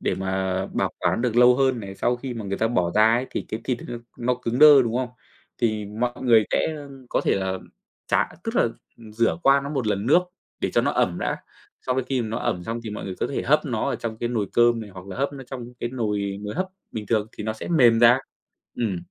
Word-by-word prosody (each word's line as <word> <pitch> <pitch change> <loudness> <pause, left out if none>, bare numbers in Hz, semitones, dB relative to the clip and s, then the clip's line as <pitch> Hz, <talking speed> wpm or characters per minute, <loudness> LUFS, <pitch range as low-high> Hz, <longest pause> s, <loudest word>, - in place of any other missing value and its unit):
để - - 0
mà 95 0 -1
bảo - - -1
quản 115 - 0
được 120 -2 0
lâu 125 0 +7
hơn 130 -3 +2
này. 95 -1 -7
Sau 120 +4 0
khi 125 0 -6
mà 110 -3 -5
người 100 0 -3
ta 110 - +2
bỏ 90 -8 +1
ra 110 +1 +5
ấy 125 +2 0
thì - - -3
cái 110 - -4
thịt 125 -2 -1
nó 120 - -4 0.2
nó 125 +1 +1
cứng 120 0 -3
đơ, 145 -3 +9
đúng 115 0 -1
không? 125 -1 -1 0.5
Thì 110 -3 0 0.2
mọi 120 0 +1
người 115 -4 +5
sẽ 160 - +1 0.3
có - - +1
thể - - +3
là 95 -1 -1 0.5
trả - - +3 0.2
tức 225 +1 -3
là - - +5 0.4
ừm, 110 -2 -13
rửa 115 +7 +1
qua 135 0 +5
nó 140 - -4
một 135 -6 -2
lần 100 +1 -1
nước 175 +6 +5 0.4
để - - 0
cho - - +3
nó - - +1
ẩm - - 0
đã, - - -1 0.5
xong 130 0 0
đến 130 - 0
khi 130 -3 0
mà 110 - -4
nó 110 - -2
ẩm 90 -1 -2
xong 115 +3 -3
thì 110 - -4
mọi 105 - -6
người 95 - -5
có - - +1
thể - - -3
hấp - - +2
nó - - -1
ở - - -1
trong 110 -1 -5
cái 120 - -2
nồi 110 -5 -1
cơm 120 -1 +4
này 105 - -8
hoặc 95 0 -11
là 100 - -7
hấp 140 +2 -1
nó 135 -2 -8
trong 125 -2 -8
cái 120 - -1
nồi 105 -5 -2
nồi 105 +4 -5
hấp 185 +3 -1 0.3
bình 110 -2 -5
thường 110 -1 +1
thì 105 - -5
nó 110 - -1
sẽ 110 - -8
mềm 120 -9 +5
ra. 120 +2 +7 0.6
Ừm. 110 -6 0
115 Hz, 265 wpm, -24 LUFS, 105-125 Hz, 0.6 s, đơ